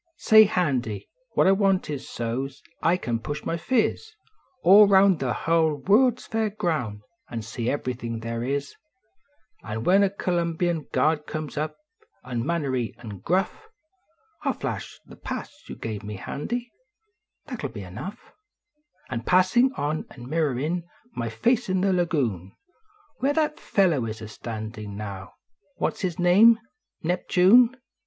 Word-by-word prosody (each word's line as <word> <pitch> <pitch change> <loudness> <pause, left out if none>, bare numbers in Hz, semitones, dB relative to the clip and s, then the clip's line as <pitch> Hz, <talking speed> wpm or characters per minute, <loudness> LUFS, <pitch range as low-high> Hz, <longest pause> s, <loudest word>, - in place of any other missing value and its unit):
Say. 220 0 +7
Handy, 135 - -1 0.3
what - - +4
I 190 - +6
want 195 -1 +2
is 145 -3 -5
so 120 +3 -2
s 135 0 -12 0.2
I 170 +2 +3
can 120 -9 -2
push 145 +6 -5
my 165 - -1
phi/. 225 +7 +1 0.7
All 200 +4 +8
round 195 -3 +5
the 130 -2 -1
hull 160 +4 +2
World 225 - +3
s - - -13
l; 225 - +1
air 220 - +1
grounds 155 - -2 0.3
an 115 -2 -5
see 115 +2 -3
everything 125 -4 -3
they 115 +3 -3
is, 140 0 -3 0.9
An 110 +1 -5
when 190 +7 +5
a 200 - +4
C 190 -1 -3
lumbian 170 -1 -1
guard 150 +3 +1
comes 155 -2 -5
up 155 +1 -3 0.5
unmannerly 130 0 -2
an 105 -5 -9
gruff, 190 - -1 0.7
I - - +1
ll - - +1
flash - - -5
the - - -13
pass - - -6 0.2
you - - -6
give 110 -3 -5
me, 105 0 -6
Handy, 235 - -4 0.7
that 250 -6 -6
ll - - 0
be 105 -6 -8
enough, 105 - -9 0.8
An 115 -2 -2
passin 185 - +4
on 150 +2 -2
an 120 -2 -11
mirrorin 155 +2 0 0.3
my 115 -1 -2
face 235 - +1
in 185 0 +1
the 195 0 +2
lagoon 130 - -1 0.6
Where 275 +3 +1
that 305 0 0
fellow 170 - +2
is 110 0 -5
a 110 - -7
standin 110 -2 -7
now 100 -3 -7 0.4
what - - 0
s - - -16
his 180 -3 -2
name? 200 +6 +6 0.5
Neptune. 190 +8 +4
155 Hz, 155 wpm, -25 LUFS, 115-190 Hz, 0.9 s, All